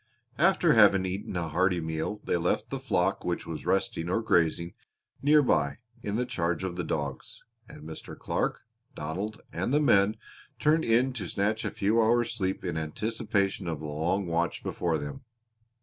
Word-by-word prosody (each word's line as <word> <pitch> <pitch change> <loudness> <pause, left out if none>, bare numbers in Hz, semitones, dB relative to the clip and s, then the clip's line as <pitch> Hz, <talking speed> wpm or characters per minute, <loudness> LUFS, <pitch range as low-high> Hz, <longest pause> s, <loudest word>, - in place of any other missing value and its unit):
After - - +4
having 95 -1 +6
eaten 95 0 -4
a 85 -2 -2
hearty 90 +2 +2
meal 80 +6 -3
they - - 0
left 85 +1 -1
the - - -2
flock - - 0
which - - -2
was - - -6
resting 95 -2 0
or 105 - +2
grazing 85 -3 +2 0.5
near 150 +1 +5
by 70 - +1 0.2
in 110 +5 -1
charge 85 -5 -1
of 95 -2 -3
the 90 - -2
dogs, 70 -4 -4 0.3
and - - -11
Mr. 80 - -8
Clark, - - -1 0.3
Donald, 95 +8 -4
and - - -1
the 145 - +4
men 105 -7 +4 0.4
turned 155 +2 +3
in 120 +3 +3
to 105 -8 -5
snatch 105 +3 0
a - - -1
few 110 +3 +2
hours' 120 +1 +3
sleep 95 -1 -2
in 85 -3 -2
anticipation 100 +3 -1
of 80 -2 -2
the 80 - -7
long 85 +6 -1
watch 85 0 -1
before 85 -2 -1
them. 75 - -6
95 Hz, 170 wpm, -28 LUFS, 80-110 Hz, 0.5 s, having